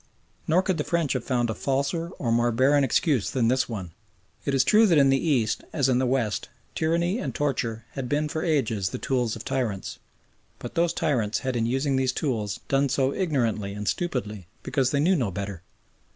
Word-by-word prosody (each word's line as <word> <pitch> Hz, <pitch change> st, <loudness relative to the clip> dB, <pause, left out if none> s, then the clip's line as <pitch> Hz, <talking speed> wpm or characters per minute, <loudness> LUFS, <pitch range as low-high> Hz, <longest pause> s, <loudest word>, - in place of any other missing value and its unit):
Nor 175 Hz, +4 st, +3 dB
could 185 Hz, -3 st, -1 dB
the -, -, +1 dB
French 170 Hz, -4 st, 0 dB
have 130 Hz, -3 st, -2 dB
found 120 Hz, -2 st, 0 dB
a -, -, -2 dB
falser 140 Hz, -, -1 dB
or 120 Hz, -4 st, -1 dB
more 120 Hz, +1 st, +2 dB
barren 140 Hz, +5 st, +3 dB
excuse 135 Hz, -, +1 dB
than 120 Hz, -3 st, +1 dB
this 130 Hz, 0 st, +1 dB
one. 95 Hz, -7 st, -5 dB, 0.5 s
It 140 Hz, -, +1 dB
is 130 Hz, -, +4 dB
true 220 Hz, +1 st, +5 dB
that 170 Hz, -5 st, +4 dB
in 135 Hz, -1 st, +5 dB
the 135 Hz, +5 st, +1 dB
East, 120 Hz, -7 st, +1 dB
as 140 Hz, -3 st, +2 dB
in 125 Hz, -1 st, +3 dB
the 130 Hz, -, +1 dB
West, 120 Hz, -5 st, -1 dB, 0.2 s
tyranny 170 Hz, +6 st, 0 dB
and -, -, -4 dB
torture 115 Hz, -6 st, -2 dB
had 130 Hz, -3 st, -5 dB
been 150 Hz, +2 st, +1 dB
for 155 Hz, +1 st, -3 dB
ages 115 Hz, -, 0 dB
the -, -, -5 dB
tools 125 Hz, -4 st, -1 dB
of -, -, -9 dB
tyrants, 120 Hz, -8 st, -3 dB, 0.6 s
but -, -, -8 dB
those 170 Hz, 0 st, +2 dB
tyrants 115 Hz, -8 st, 0 dB
had 130 Hz, -1 st, -2 dB
in 115 Hz, -1 st, +1 dB
using 135 Hz, +2 st, 0 dB
those 130 Hz, -1 st, +1 dB
tools 110 Hz, -9 st, -2 dB
done 140 Hz, 0 st, +2 dB
so 135 Hz, +1 st, +1 dB
ignorantly 115 Hz, -, -1 dB
and 105 Hz, 0 st, -5 dB
stupidly 110 Hz, -, -2 dB, 0.2 s
because 130 Hz, -3 st, +1 dB
they 140 Hz, -, 0 dB
knew 180 Hz, +6 st, +3 dB
no 125 Hz, -, 0 dB
better. 95 Hz, -1 st, -5 dB
130 Hz, 205 wpm, -26 LUFS, 115-150 Hz, 0.6 s, true